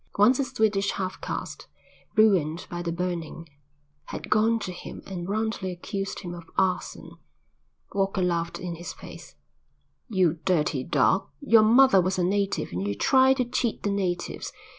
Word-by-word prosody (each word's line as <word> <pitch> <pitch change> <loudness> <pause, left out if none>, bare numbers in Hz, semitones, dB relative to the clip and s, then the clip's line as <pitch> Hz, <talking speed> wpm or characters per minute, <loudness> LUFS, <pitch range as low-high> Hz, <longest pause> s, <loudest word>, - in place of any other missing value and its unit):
Once 225 +6 +5
a - - +3
Swedish 215 -6 0
half 190 -1 -4
caste, - - -5 0.5
ruined 185 -7 +3
by 175 0 -4
the 170 -1 -2
burning, 170 -2 -4 0.6
had - - -8
gone 220 +2 +4
to 195 -4 -5
him 175 - -9
and 180 -1 -6
roundly 215 -2 -1
accused 195 +2 -5
him 175 -3 -6
of 170 -1 -10
arson. 190 -1 -1 0.8
Walker 195 -1 0
laughed 170 -1 -1
in 175 -2 -5
his 175 - -7
face. - - -12 0.7
"You 180 -6 +2
dirty 150 -7 +1
dog. 140 0 +2
Your 225 +5 +5
mother 235 -1 +6
was 185 +1 -1
a 180 - +1
native 200 +2 0
and 90 +3 -3
you 100 - -2
try 265 - +5
to 255 -2 0
cheat 240 -1 -2
the 205 - 0
natives. 185 -3 -2
190 Hz, 160 wpm, -26 LUFS, 175-215 Hz, 0.8 s, mother